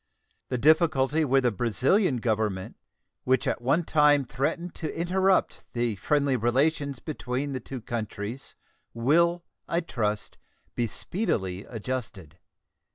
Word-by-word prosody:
The 125 - -1
difficulty 155 +1 +3
with 135 -2 +3
the 125 - +3
Brazilian 125 - +2
Government, 110 -5 -1 0.5
which 130 -1 +2
at - - -1
one 140 +8 +2
time 150 -3 +4
threatened 160 +8 -2
to 160 -1 -5
interrupt 190 +2 +1
the 120 -2 0
friendly 140 +5 +1
relations 140 +4 +1
between 135 -1 -4
the 130 - -2
two 130 +1 -7
countries, 115 +2 -5 0.4
will, 170 +8 +2 0.2
I 170 - 0
trust, 105 -10 -3 0.3
be 120 - 0
speedily 100 - -2
adjusted. 110 - -6
130 Hz, 120 wpm, -27 LUFS, 115-155 Hz, 0.5 s, time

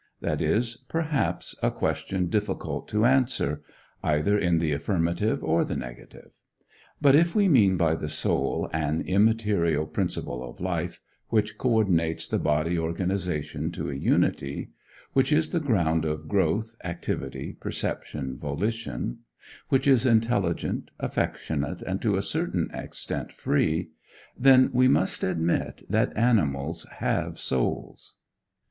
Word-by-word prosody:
that - - -2
is, 115 +1 +1
perhaps, 160 -3 -1
a - - +3
question 95 -1 -1
difficult 105 +4 -2
to 105 +2 +1
answer 125 - +2 0.4
either 80 +7 +2
in 90 -4 +2
the 80 -2 +1
affirmative 85 +6 0
or 80 +1 +2
the - - -3
negative. - - -9 0.6
But 140 -3 +5
if 170 +5 +4
we 205 -2 +4
mean 105 - +5
by 80 -2 +3
the 75 -1 -3
soul 75 - 0
an 80 0 0
immaterial 100 -6 +2
principle 65 -4 -2
of - - -10
life, - - -3 0.3
which 110 -1 +1
coördinates 95 -10 +2
the - - 0
bodily 80 +3 +1
organization 90 -1 -2
to - - -4
a - - -4
unity; 70 0 0 0.4
which 135 +3 +3
is 155 +1 +2
the 170 - +1
ground 85 - +1
of 75 0 -3
growth, 110 +5 0
activity, 85 -6 -4
perception, 65 -3 -4
volition; 70 - -3 0.5
which 135 0 +2
is 130 -4 +5
intelligent, 110 -7 +1
affectionate, 75 -2 -2
and - - -3
to - - +2
a - - -1
certain - - -1
extent - - -4
free; 80 +1 0 0.4
then 130 0 +6
we 130 +1 +5
must 95 -7 +2
admit 85 -2 -1
that 110 +4 +1
animals 85 - +1
have - - -1
souls. 65 -2 -2
90 Hz, 130 wpm, -26 LUFS, 80-115 Hz, 0.6 s, then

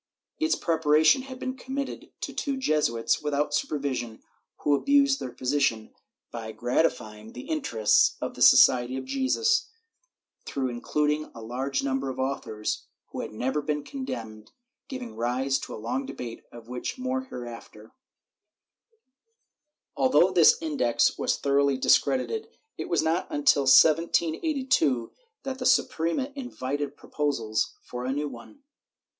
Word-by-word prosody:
Its 320 0 +2
preparation 160 - +3
had 260 0 -9
been 260 0 -4
committed 265 +2 -6
to - - -4
two 275 -2 -2
Jesuits, 150 - +1
without 150 0 -1
supervision, 130 -8 -2 0.4
who 145 - +2
abused 280 - +3
their 125 - -5
position 125 -4 -1 0.4
by 110 -1 -6
gratifying 110 -4 -1
the - - -9
interests 195 - +2
of - - -4
the - - -11
Society 125 +1 +6
of - - -5
Jesus 435 - +1 0.7
through 135 -2 -2
including 150 +5 -1
a 115 - -9
large 130 +5 -2
number 135 0 -1
of 130 - -6
authors 130 -5 -3 0.2
who - - -4
had - - -6
never 130 +7 -2
been 150 0 -2
condemned, 115 - -7 0.4
giving 260 -4 -7
rise 130 +3 0
to - - -7
a - - -7
long 260 - -3
debate, 120 - -7
of 120 -1 -12
which 125 - -5
more 260 0 -2
hereafter/ 115 - -10 2.0
Although - - +4
this 470 +1 +6
Index 285 - +1
was - - 0
thoroughly 140 -1 +2
discredited, 425 - +2 0.3
it - - -6
was 170 - +2
not 165 +3 0
until 285 - +3
1782 165 - +3 0.3
that 265 -1 -5
the - - -4
Suprema 250 - +1
invited 145 - -4
proposals 115 -8 -2
for 125 0 -6
a 130 - -1
new 145 +2 -2
one. 135 - -12
145 Hz, 135 wpm, -27 LUFS, -, 2.0 s, Society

